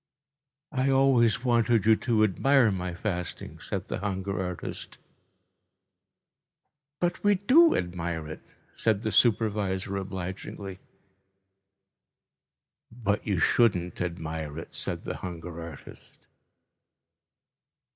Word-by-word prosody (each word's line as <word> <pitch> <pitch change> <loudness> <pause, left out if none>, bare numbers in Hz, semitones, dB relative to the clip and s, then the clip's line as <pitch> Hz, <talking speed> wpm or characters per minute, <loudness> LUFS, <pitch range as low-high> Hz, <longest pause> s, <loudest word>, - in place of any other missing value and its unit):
"I 135 -2 +1
always 130 -4 +3
wanted 115 -3 +3
you 110 0 +6
to 110 -2 +1
admire 120 +4 +4
my 90 -2 -3
fasting," 90 -3 -4
said - - -5
the - - -3
hunger 95 -1 -2
artist. 90 -2 -6 2.0
"But 175 0 -1
we 205 0 +5
do 275 - +5
admire 85 -3 -3
it," 80 - -8 0.3
said 110 -2 +1
the 110 - -1
supervisor 100 -4 +1
obligingly. 95 0 -6 2.1
"But 110 -3 -2
you 100 -3 +1
shouldn't 90 -2 +2
admire 80 -3 -4
it," 80 - -8
said - - -3
the - - -4
hunger 85 -2 -7
artist. 80 -4 -12
100 Hz, 100 wpm, -28 LUFS, 90-115 Hz, 2.1 s, you